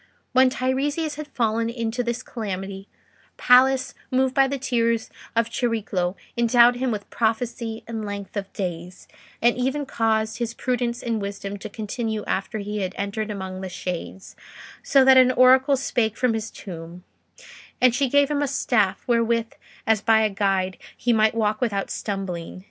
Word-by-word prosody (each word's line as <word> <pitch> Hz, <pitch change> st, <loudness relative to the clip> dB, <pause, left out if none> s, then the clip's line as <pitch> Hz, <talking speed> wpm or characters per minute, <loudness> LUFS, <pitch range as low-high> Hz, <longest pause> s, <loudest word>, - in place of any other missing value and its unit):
When 260 Hz, 0 st, +6 dB
Teiresias 285 Hz, +5 st, -1 dB
had 305 Hz, 0 st, -7 dB
fallen 230 Hz, -4 st, 0 dB
into 230 Hz, 0 st, -2 dB
this 240 Hz, +1 st, -3 dB
calamity, 195 Hz, -3 st, -5 dB, 0.5 s
Pallas, 260 Hz, +1 st, +4 dB, 0.2 s
moved 260 Hz, 0 st, +1 dB
by 270 Hz, 0 st, +4 dB
the 280 Hz, +1 st, -2 dB
tears 230 Hz, -3 st, 0 dB, 0.2 s
of 230 Hz, 0 st, +1 dB
Chariclo, 215 Hz, -7 st, -1 dB, 0.2 s
endowed 240 Hz, +1 st, +5 dB
him 260 Hz, +1 st, -1 dB
with 210 Hz, -3 st, -4 dB
prophecy 225 Hz, 0 st, -2 dB
and 225 Hz, -1 st, -5 dB
length 205 Hz, -1 st, -6 dB
of 200 Hz, -1 st, -4 dB
days, 180 Hz, -1 st, -6 dB, 0.4 s
and 240 Hz, 0 st, +4 dB
even 265 Hz, +3 st, -1 dB
caused 220 Hz, -3 st, 0 dB
his 235 Hz, -1 st, -3 dB
prudence 245 Hz, -2 st, -2 dB
and 230 Hz, -3 st, -1 dB
wisdom 200 Hz, 0 st, -5 dB
to 215 Hz, -, -7 dB
continue 220 Hz, +1 st, -4 dB
after 195 Hz, +4 st, -2 dB
he 210 Hz, 0 st, -4 dB
had 185 Hz, -1 st, -3 dB
entered 205 Hz, +2 st, -3 dB
among 190 Hz, -2 st, -5 dB
the 190 Hz, -, -5 dB
shades, 180 Hz, +1 st, -6 dB, 0.5 s
so 270 Hz, -2 st, +4 dB
that 265 Hz, 0 st, +7 dB
an 255 Hz, -1 st, +7 dB
oracle 260 Hz, +2 st, +5 dB
spake 225 Hz, -4 st, -1 dB
from 250 Hz, -3 st, +2 dB
his 225 Hz, 0 st, -3 dB
tomb: 170 Hz, -1 st, -9 dB, 0.8 s
and 255 Hz, -2 st, +5 dB
she 270 Hz, +1 st, +1 dB
gave 285 Hz, +2 st, +3 dB
him 290 Hz, -1 st, 0 dB
a 290 Hz, -, +1 dB
staff, 225 Hz, -7 st, +1 dB
wherewith, 230 Hz, -1 st, +1 dB, 0.3 s
as 220 Hz, -2 st, +2 dB
by 220 Hz, 0 st, +4 dB
a 215 Hz, -1 st, +1 dB
guide, 195 Hz, -2 st, 0 dB, 0.2 s
he 240 Hz, +1 st, +1 dB
might 220 Hz, 0 st, +3 dB
walk 215 Hz, 0 st, 0 dB
without 200 Hz, -5 st, -1 dB
stumbling... 185 Hz, -4 st, -4 dB
225 Hz, 165 wpm, -24 LUFS, 200-250 Hz, 0.8 s, that